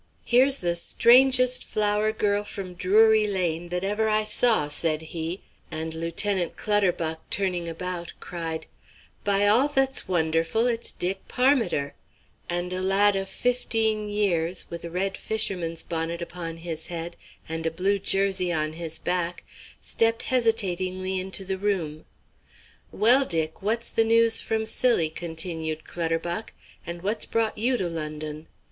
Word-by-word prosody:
"Here's 260 Hz, +3 st, +4 dB
the 175 Hz, -1 st, 0 dB
strangest 255 Hz, +6 st, +5 dB
flower 210 Hz, 0 st, 0 dB
girl 205 Hz, -1 st, 0 dB
from 195 Hz, -3 st, -7 dB
Drury 215 Hz, +4 st, +4 dB
Lane 175 Hz, -4 st, -1 dB
that 180 Hz, +1 st, -2 dB
ever 210 Hz, +3 st, 0 dB
I 215 Hz, 0 st, +2 dB
saw," 215 Hz, -6 st, +3 dB
said 155 Hz, +1 st, -1 dB
he, 165 Hz, +3 st, -5 dB, 0.3 s
and 160 Hz, 0 st, -4 dB
Lieutenant 170 Hz, +3 st, -1 dB
Clutterbuck 180 Hz, -6 st, +1 dB
turning 180 Hz, -4 st, 0 dB
about 175 Hz, 0 st, -5 dB
cried: 165 Hz, -2 st, -5 dB, 0.6 s
"By 200 Hz, 0 st, +2 dB
all 230 Hz, +7 st, +5 dB
that's 270 Hz, -4 st, +1 dB
wonderful, 165 Hz, +4 st, +1 dB
it's 235 Hz, -1 st, 0 dB
Dick 190 Hz, +2 st, -3 dB
Parmiter," 245 Hz, -, +1 dB, 0.6 s
and 175 Hz, +1 st, -2 dB
a 185 Hz, -, -2 dB
lad 195 Hz, +2 st, +4 dB
of 195 Hz, 0 st, -3 dB
fifteen 220 Hz, -2 st, 0 dB
years, 185 Hz, -4 st, 0 dB
with 170 Hz, 0 st, -6 dB
a 170 Hz, -, -5 dB
red 190 Hz, +3 st, -2 dB
fisherman's 180 Hz, -6 st, -2 dB
bonnet 165 Hz, 0 st, -3 dB
upon 170 Hz, -1 st, -6 dB
his 165 Hz, -1 st, -5 dB
head 170 Hz, 0 st, -5 dB, 0.3 s
and 160 Hz, 0 st, -3 dB
a -, -, +2 dB
blue 195 Hz, +5 st, 0 dB
jersey 195 Hz, -2 st, +1 dB
on 155 Hz, -2 st, -1 dB
his 165 Hz, -1 st, -4 dB
back, 175 Hz, -1 st, -2 dB, 0.4 s
stepped 225 Hz, 0 st, +1 dB
hesitatingly 190 Hz, -6 st, 0 dB
into 190 Hz, +1 st, -4 dB
the 190 Hz, 0 st, -3 dB
room. 175 Hz, -7 st, -2 dB, 0.9 s
"Well, 245 Hz, +5 st, +5 dB
Dick, 160 Hz, -8 st, -1 dB
what's 230 Hz, +4 st, -1 dB
the 225 Hz, -, +3 dB
news 230 Hz, 0 st, +3 dB
from 220 Hz, 0 st, -1 dB
Scilly?" 220 Hz, -8 st, +2 dB
continued 160 Hz, -1 st, -3 dB
Clutterbuck. 170 Hz, +4 st, -3 dB, 0.3 s
"And 170 Hz, 0 st, -6 dB
what's 210 Hz, +3 st, -2 dB
brought 225 Hz, -2 st, 0 dB
you 245 Hz, +3 st, +2 dB
to 185 Hz, -, -1 dB
London? 155 Hz, -1 st, -5 dB
185 Hz, 140 wpm, -25 LUFS, 165-215 Hz, 0.9 s, strangest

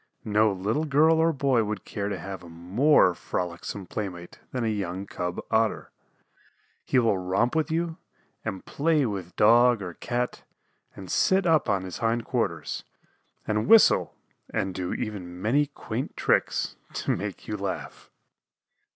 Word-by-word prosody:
No 105 Hz, 0 st, +3 dB
little 105 Hz, +11 st, -1 dB
girl 155 Hz, +3 st, +4 dB
or 165 Hz, +1 st, +4 dB
boy 135 Hz, -5 st, +2 dB
would 105 Hz, 0 st, -4 dB
care 100 Hz, -1 st, -3 dB
to 100 Hz, -, -3 dB
have 95 Hz, +1 st, -7 dB
a 85 Hz, -, -12 dB
more 90 Hz, -, +3 dB
frolicsome 90 Hz, +3 st, -4 dB
playmate 90 Hz, -3 st, -6 dB
than 125 Hz, -2 st, -2 dB
a -, -, 0 dB
young 100 Hz, -3 st, -2 dB
cub 90 Hz, -2 st, -4 dB
Otter. -, -, +1 dB, 0.9 s
He -, -, 0 dB
will 115 Hz, -6 st, +3 dB
romp 95 Hz, +9 st, 0 dB
with 160 Hz, 0 st, +1 dB
you, 165 Hz, +1 st, -1 dB, 0.5 s
and 95 Hz, -4 st, -5 dB
play 150 Hz, -1 st, +1 dB
with 95 Hz, -6 st, -5 dB
Dog 120 Hz, +2 st, +5 dB
or 90 Hz, -2 st, -6 dB
Cat 120 Hz, +6 st, -3 dB, 0.5 s
and 95 Hz, -2 st, -8 dB
sit 190 Hz, 0 st, +3 dB
up 160 Hz, -7 st, +3 dB
on 100 Hz, -2 st, +1 dB
his 90 Hz, -1 st, -6 dB
hindquarters, 115 Hz, 0 st, -1 dB, 0.6 s
and 105 Hz, 0 st, 0 dB
whistle 225 Hz, -1 st, +6 dB, 0.4 s
and 95 Hz, -1 st, -1 dB
do 90 Hz, -1 st, -3 dB
even 90 Hz, -5 st, -5 dB
many 135 Hz, +9 st, +2 dB
quaint 125 Hz, -3 st, -5 dB
tricks -, -, +1 dB, 0.2 s
to -, -, 0 dB
make -, -, -6 dB
you 105 Hz, -, -2 dB
laugh. 100 Hz, -2 st, -5 dB
105 Hz, 150 wpm, -26 LUFS, 95-135 Hz, 0.9 s, whistle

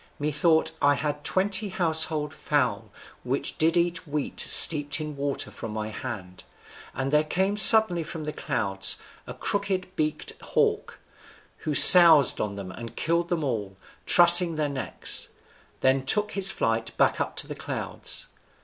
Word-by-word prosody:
Methought 160 Hz, +2 st, -1 dB
I 145 Hz, 0 st, +1 dB
had 150 Hz, 0 st, -6 dB
twenty 195 Hz, +3 st, -2 dB
household 160 Hz, -5 st, -1 dB
fowl 120 Hz, -10 st, -4 dB, 0.3 s
which 130 Hz, +3 st, -4 dB
did 165 Hz, +2 st, +1 dB
eat 170 Hz, -1 st, -3 dB
wheat 145 Hz, -1 st, -7 dB
steeped 145 Hz, -2 st, +5 dB
in 150 Hz, -1 st, -8 dB
water 140 Hz, 0 st, -6 dB
from 110 Hz, -, -10 dB
my 110 Hz, 0 st, -7 dB
hand, 95 Hz, -5 st, -10 dB, 0.5 s
and 135 Hz, +2 st, -5 dB
there 150 Hz, 0 st, +1 dB
came 190 Hz, +6 st, -3 dB
suddenly 210 Hz, -4 st, +7 dB
from 160 Hz, -1 st, -10 dB
the 150 Hz, -, -7 dB
clouds 100 Hz, -8 st, -3 dB, 0.3 s
a -, -, -10 dB
crooked 190 Hz, -2 st, -5 dB
beaked 155 Hz, -2 st, -5 dB
hawk, -, -, -4 dB, 0.6 s
who 150 Hz, -, -6 dB
soused 165 Hz, -4 st, +8 dB
on 100 Hz, -1 st, -6 dB
them 95 Hz, -2 st, -10 dB
and 115 Hz, +4 st, -12 dB
killed 170 Hz, +1 st, -3 dB
them 170 Hz, -3 st, -4 dB
all, 105 Hz, -8 st, -6 dB, 0.3 s
trussing 175 Hz, -1 st, +6 dB
their 150 Hz, -1 st, -4 dB
necks; 135 Hz, -2 st, -3 dB, 0.5 s
then 130 Hz, 0 st, 0 dB
took 210 Hz, +10 st, -1 dB
his 195 Hz, -1 st, +3 dB
flight 115 Hz, -7 st, -4 dB
back -, -, -1 dB
up -, -, -6 dB
to -, -, -3 dB
the -, -, -9 dB
clouds. -, -, -5 dB
150 Hz, 150 wpm, -23 LUFS, 130-175 Hz, 0.6 s, soused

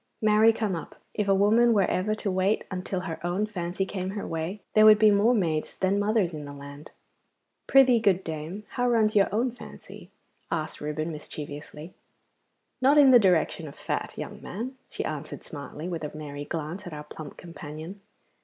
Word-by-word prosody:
Marry 215 Hz, +1 st, +5 dB
come 215 Hz, -4 st, -2 dB
up! 165 Hz, -, -7 dB, 0.2 s
if 210 Hz, -2 st, -1 dB
a 195 Hz, -, +4 dB
woman 225 Hz, +4 st, +4 dB
were 200 Hz, -3 st, +4 dB
ever 210 Hz, +4 st, 0 dB
to 210 Hz, -2 st, -2 dB
wait 190 Hz, +3 st, +1 dB
until 185 Hz, 0 st, -3 dB
her 170 Hz, -3 st, -6 dB
own 180 Hz, +4 st, 0 dB
fancy 185 Hz, -2 st, -3 dB
came 190 Hz, -1 st, -4 dB
her 200 Hz, +1 st, -4 dB
way, 165 Hz, +5 st, -4 dB
there 215 Hz, -, +6 dB
would 215 Hz, 0 st, +9 dB
be 215 Hz, 0 st, +6 dB
more 210 Hz, +5 st, +4 dB
maids 160 Hz, -7 st, -1 dB
than 190 Hz, +1 st, +1 dB
mothers 205 Hz, -4 st, +1 dB
in 150 Hz, -1 st, -6 dB
the 145 Hz, -, -8 dB
land.' 140 Hz, +1 st, -10 dB, 0.8 s
'Prythee, 260 Hz, -3 st, +6 dB
good 190 Hz, -4 st, +2 dB
dame, 160 Hz, +6 st, -5 dB
how 245 Hz, -1 st, 0 dB
runs 220 Hz, -3 st, +2 dB
your 200 Hz, -1 st, +5 dB
own 235 Hz, +5 st, +1 dB
fancy?' 245 Hz, -, -12 dB, 0.4 s
asked 155 Hz, -1 st, -3 dB
Reuben 155 Hz, +2 st, -3 dB
mischievously. 150 Hz, +1 st, -8 dB, 0.9 s
'Not 275 Hz, +3 st, +5 dB
in 280 Hz, -3 st, +8 dB
the 245 Hz, -, +9 dB
direction 175 Hz, -4 st, +2 dB
of 140 Hz, -, -10 dB
fat, -, -, -4 dB
young -, -, -7 dB
man,' 240 Hz, +8 st, -6 dB
she -, -, -4 dB
answered 155 Hz, -2 st, -5 dB
smartly, 150 Hz, +2 st, -7 dB
with 170 Hz, -3 st, -4 dB
a 150 Hz, 0 st, -6 dB
merry 145 Hz, -1 st, -6 dB
glance 165 Hz, +5 st, -5 dB
at 170 Hz, -, -7 dB
our 150 Hz, 0 st, -6 dB
plump 150 Hz, 0 st, -10 dB
companion. 165 Hz, +3 st, -9 dB
185 Hz, 185 wpm, -27 LUFS, 155-215 Hz, 0.9 s, would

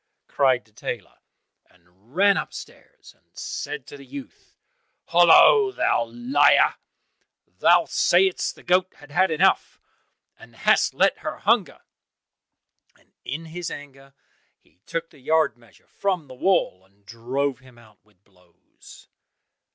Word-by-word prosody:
cried 130 Hz, -3 st, +1 dB
the 110 Hz, -, -28 dB
tailor, 105 Hz, -, -7 dB, 0.5 s
and 90 Hz, -, -28 dB
ran 200 Hz, +1 st, +4 dB
upstairs -, -, -9 dB
and -, -, -34 dB
said 445 Hz, 0 st, -6 dB
to -, -, -12 dB
the 140 Hz, -, -13 dB
youth, 280 Hz, -, -12 dB, 0.5 s
"Hollo, 420 Hz, -4 st, +6 dB
thou 115 Hz, -, 0 dB
liar: 120 Hz, +5 st, +3 dB, 0.9 s
thou 175 Hz, 0 st, +4 dB
saidest 185 Hz, +1 st, +1 dB
the -, -, -18 dB
goat 185 Hz, +1 st, +1 dB
had 145 Hz, -1 st, -17 dB
had 185 Hz, +5 st, +2 dB
enough, 155 Hz, -1 st, +1 dB, 0.6 s
and -, -, -17 dB
hast -, -, +2 dB
let -, -, +2 dB
her -, -, -6 dB
hunger!" -, -, 0 dB, 1.2 s
and -, -, -32 dB
in 160 Hz, +4 st, -6 dB
his 170 Hz, +1 st, -6 dB
anger 135 Hz, -1 st, -12 dB, 0.4 s
he -, -, -34 dB
took 165 Hz, 0 st, -4 dB
the 145 Hz, -, -19 dB
yard 155 Hz, -2 st, +1 dB
measure 120 Hz, -1 st, -24 dB
from 185 Hz, -5 st, -3 dB
the 130 Hz, -, -12 dB
wall, 125 Hz, -, 0 dB
and 100 Hz, +1 st, -32 dB
drove 125 Hz, +6 st, -3 dB
him 130 Hz, -2 st, -19 dB
out 110 Hz, -3 st, -21 dB
with 105 Hz, -2 st, -34 dB
blows. 90 Hz, -3 st, -20 dB
140 Hz, 135 wpm, -23 LUFS, 115-175 Hz, 1.2 s, Hollo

